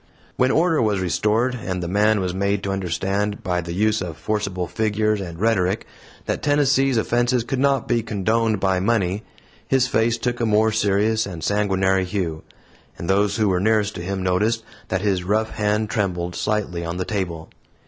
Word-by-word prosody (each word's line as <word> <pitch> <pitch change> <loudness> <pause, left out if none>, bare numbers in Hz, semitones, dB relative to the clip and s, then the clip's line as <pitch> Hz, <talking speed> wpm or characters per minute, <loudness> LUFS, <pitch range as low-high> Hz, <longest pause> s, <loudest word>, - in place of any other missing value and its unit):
When 130 - +2
order 160 +1 +3
was 105 -3 +1
restored, 105 +7 +1
and 95 -6 -4
the - - -3
man 105 +3 +2
was 90 -1 -2
made 100 +1 0
to 100 - -2
understand, 95 +2 -2
by 90 -2 0
the 85 0 -6
use 105 +4 +1
of 85 -3 -5
forcible 100 0 -2
figures 105 +3 0
and 85 -3 -7
rhetoric, 100 -2 +1 0.4
that - - -2
Tennessee's 135 -3 +2
offense 120 +1 +1
could 130 +2 -3
not 140 -2 +2
be 120 -1 +2
condoned 110 +1 0
by 95 -1 +1
money, 100 -1 +1 0.5
his 130 -1 +3
face 115 -1 +1
took 120 +1 -2
a 120 - +1
more 110 +1 +3
serious 110 +1 +1
and 85 -5 -7
sanguinary 95 -2 +1
hue, 90 -4 -3 0.6
and 85 - -6
those 100 +1 +2
who 110 -2 +2
were 90 -1 +1
nearest 105 +1 +2
to 85 - -6
him 95 +1 -3
noticed 105 +5 +1 0.2
that 95 0 -1
his 95 -3 0
rough 110 +4 0
hand 105 0 0
trembled 90 -4 -1
slightly 105 -5 -1
on 85 +1 -4
the 90 - -2
table. 85 -6 -3
105 Hz, 180 wpm, -22 LUFS, 95-110 Hz, 0.6 s, order